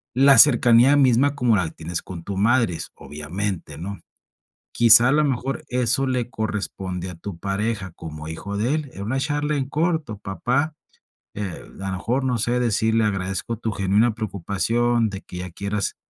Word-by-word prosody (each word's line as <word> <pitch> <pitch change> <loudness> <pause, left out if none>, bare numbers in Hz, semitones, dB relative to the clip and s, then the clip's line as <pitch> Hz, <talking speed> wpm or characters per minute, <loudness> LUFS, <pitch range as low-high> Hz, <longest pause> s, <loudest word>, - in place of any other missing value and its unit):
la 135 0 +6
cercanía 120 0 +6
misma 135 +1 +3
como 125 -5 +2
la 90 -5 0
tienes 85 +1 -4
con 85 -3 -9
tu 100 0 -5
madre, 115 -4 +2 0.2
obviamente, 80 +1 -5
¿no?, 100 +3 -6 0.8
quizá 120 +1 +8
a - - +3
lo 150 0 +3
mejor 135 0 -2
eso 125 +1 +1
le 125 -2 -2
corresponde 95 -5 -4
a 90 - -7
tu 85 +1 -8
pareja 100 0 -3
como 75 -2 -9
hijo 100 +6 -6
de 120 +8 0
él, 155 -4 -3
es - - -10
una 120 +7 -2
charla 145 +1 -1
en 135 -1 -2
corto. 155 - -1
Papá, 125 +10 -2 0.6
eh, 100 -5 -6 0.2
a 95 - -3
lo - - -3
mejor, 125 +8 -1
no 125 -2 0
sé, 120 +3 0
decirle, 110 -1 +1
agradezco 95 +2 -2
tu 110 -1 -3
genuina 100 +4 +1
preocupación 110 +3 0
de 95 0 -7
que 90 - -10
ya 90 0 -6
quieras, 100 +3 -3
110 Hz, 170 wpm, -22 LUFS, 95-125 Hz, 0.8 s, quizá